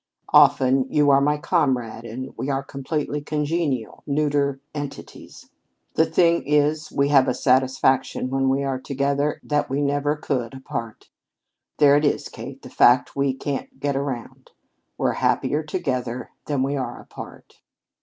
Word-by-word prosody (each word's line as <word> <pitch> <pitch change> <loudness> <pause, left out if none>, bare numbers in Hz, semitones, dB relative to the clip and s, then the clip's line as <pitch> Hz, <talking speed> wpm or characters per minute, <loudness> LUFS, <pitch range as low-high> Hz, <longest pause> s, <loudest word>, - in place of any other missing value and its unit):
Often 135 -3 +5
you 145 -1 +4
are 135 0 +5
my 150 +1 +2
comrade, 130 -8 0
and 130 +4 -7
we 135 - -4
are 135 0 -1
completely 145 +2 -3
congenial, 150 -5 -2
neuter 140 -1 0
entities. 145 -2 -8 0.5
The 160 - +3
thing 170 +1 +3
is 150 +1 +1
we 140 0 +1
have 135 -2 +5
a - - +1
satisfaction 130 0 +1
when 135 0 +1
we 135 +1 +1
are 135 -2 -2
together 140 +2 -1
that 150 0 0
we 135 +2 -1
never 145 +1 0
could 130 -5 -3
apart. 115 -4 -6 0.7
There 145 -1 +6
it 150 - 0
is, 145 - 0
Kate, - - -9
the - - -10
fact 125 +1 +4
we 140 -1 +1
can't 135 0 -5
get 140 0 -1
around. 135 -4 -5 0.5
We're - - +1
happier 150 - +1
together 130 -7 -3 0.2
than 140 -3 0
we 140 +2 -1
are 125 -3 -4
apart!" - - -12
140 Hz, 150 wpm, -23 LUFS, 130-145 Hz, 0.7 s, There